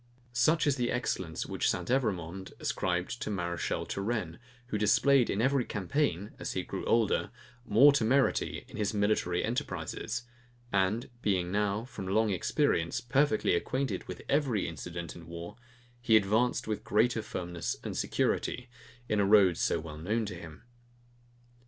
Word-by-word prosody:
Such 155 +8 +3
is 145 -2 +2
the 120 -1 0
excellence 95 -9 -2
which - - 0
St. 90 -1 -1
Evremond 95 -8 -1
ascribes 90 +2 -1
to - - -4
Mareschal 85 -4 -2
Turenne, 100 -5 -3 0.3
who 105 - -1
displayed 125 +5 +4
every 130 +5 +2
campaign, 100 - -1
as - - -4
he - - -2
grew - - -5
older, 115 -3 +2 0.4
more 130 +8 +7
temerity 135 +1 +1
in - - -10
his 105 -1 -1
military 105 +1 +1
enterprises; - - -3 0.5
and 100 +6 +1
being 90 -5 0
now, 105 +2 0
from 100 -6 -7
long 110 +2 +2
experience, 95 - +1
perfectly 125 -2 +2
acquainted 130 +10 -1
with - - -7
every 135 -9 +1
incident 85 +1 -6
in 85 -1 -11
war, 85 +3 -7 0.5
he 115 -2 +5
advanced 110 +5 +1
with 110 -1 -2
greater 110 +2 +2
firmness 90 -4 -4
and - - -4
security, - - -1 0.4
in 105 - +1
a - - +4
road 100 -4 +6
so - - +1
well 75 -1 -8
known 110 +7 -1
to 100 - -5
him. 85 -3 -10
105 Hz, 145 wpm, -30 LUFS, 90-120 Hz, 0.5 s, more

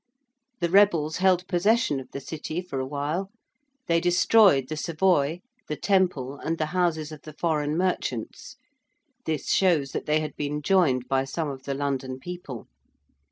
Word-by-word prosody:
The 170 - +1
rebels 170 -6 +4
held 185 -1 +2
possession 200 -3 +2
of 130 -1 -10
the - - -6
City 155 +3 -5
for 180 -7 -5
awhile. 145 +8 -3 0.6
They 170 0 +2
destroyed 175 - +4
the 155 - -4
Savoy, 165 -1 +1 0.3
the 150 - -3
Temple 175 -8 0
and 165 +1 -2
the 155 - 0
houses 165 -4 0
of 155 - -10
the 155 - -11
foreign 155 -1 -1
merchants 180 - -3 0.7
(this 155 -3 -2
shows 165 -8 +2
that - - -5
they 155 +1 +3
had 155 -1 -5
been 150 0 -3
joined 140 -9 +2
by 135 0 +1
some 150 +2 -3
of 130 -1 -10
the 140 - -2
London 135 -2 -3
people). 175 -7 -8
155 Hz, 160 wpm, -26 LUFS, 140-180 Hz, 0.7 s, rebels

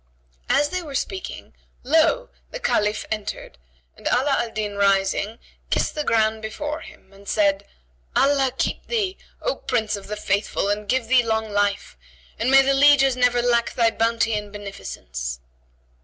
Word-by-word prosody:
As 290 0 +3
they 365 +3 -2
were 295 -5 -8
speaking, 375 +7 -5 0.3
lo! 325 - +3 0.2
the - - -6
Caliph 210 - 0
entered 210 - -5 0.4
and - - -7
Ala 270 +2 +2
al 235 - -1
Din 210 -2 -4
rising, 200 +2 +1 0.3
kissed - - 0
the 300 - -2
ground 220 -3 +1
before 295 +8 -4
him 190 - -15
and 200 +1 -12
said, 200 -1 +1 0.5
"Allah 275 -2 +3
keep - - -2
thee, 410 -5 -1 0.3
O - - 0
Prince 215 -2 -1
of 200 - -9
the 210 +1 -4
Faithful, 200 0 0
and 205 0 -2
give 255 -3 +1
thee 255 0 +5
long 220 -2 -1
life; 205 - -1 0.4
and 240 - +1
may 270 0 +7
the 275 +1 +2
lieges 270 -1 +5
never 245 -1 +2
lack 235 -1 +2
thy 230 -2 +3
bounty 230 0 +1
and 210 -1 -3
beneficence!" 65 - -6
225 Hz, 160 wpm, -23 LUFS, 205-270 Hz, 0.5 s, may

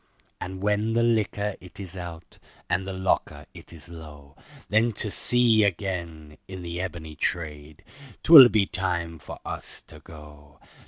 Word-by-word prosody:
And 95 +1 -7
when 105 +2 +1
the 115 +1 +2
liquor 105 -3 0
it 90 +1 -13
is 95 -2 -9
out, 85 -2 -9 0.3
and 95 +2 -1
the - - -4
locker 95 0 -1
it - - -14
is 85 0 -13
low, 75 -4 -12 0.3
Then 110 +3 +2
to 105 0 -3
sea 120 -2 +2
again, 85 -6 -3
in 95 -1 -8
the 85 +1 -4
ebony 85 -4 -6
trade, 75 -2 -4 0.4
'twill 140 -7 +10
be 105 -4 +2
time 85 -4 -2
for 75 - -9
us - - -7
to - - -15
go. 75 -2 -15
90 Hz, 155 wpm, -25 LUFS, 80-105 Hz, 0.4 s, twill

